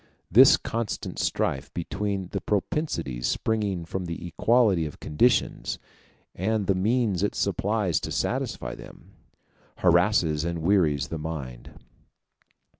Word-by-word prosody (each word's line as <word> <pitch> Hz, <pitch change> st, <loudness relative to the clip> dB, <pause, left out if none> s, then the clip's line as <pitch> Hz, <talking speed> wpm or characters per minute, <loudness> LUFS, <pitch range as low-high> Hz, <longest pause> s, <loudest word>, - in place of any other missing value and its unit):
This 125 Hz, +8 st, +8 dB
constant 115 Hz, -2 st, -4 dB
strife 65 Hz, -, -1 dB
between 95 Hz, +2 st, -3 dB
the -, -, -3 dB
propensities 90 Hz, -, -2 dB
springing 105 Hz, -6 st, -1 dB
from 90 Hz, +2 st, -4 dB
the 85 Hz, 0 st, -6 dB
equality 100 Hz, -2 st, +2 dB
of 75 Hz, -, -11 dB
conditions 100 Hz, +12 st, +1 dB, 0.6 s
and 105 Hz, +2 st, -1 dB
the 100 Hz, -, +2 dB
means 105 Hz, 0 st, +1 dB
it 105 Hz, -, 0 dB
supplies 100 Hz, -3 st, 0 dB
to -, -, -5 dB
satisfy -, -, -2 dB
them, -, -, -13 dB, 0.6 s
harasses 75 Hz, -1 st, +3 dB
and 85 Hz, -1 st, -3 dB
wearies 80 Hz, -7 st, +2 dB
the 80 Hz, -, -4 dB
mind. 70 Hz, -6 st, -7 dB
95 Hz, 115 wpm, -26 LUFS, 80-105 Hz, 0.6 s, This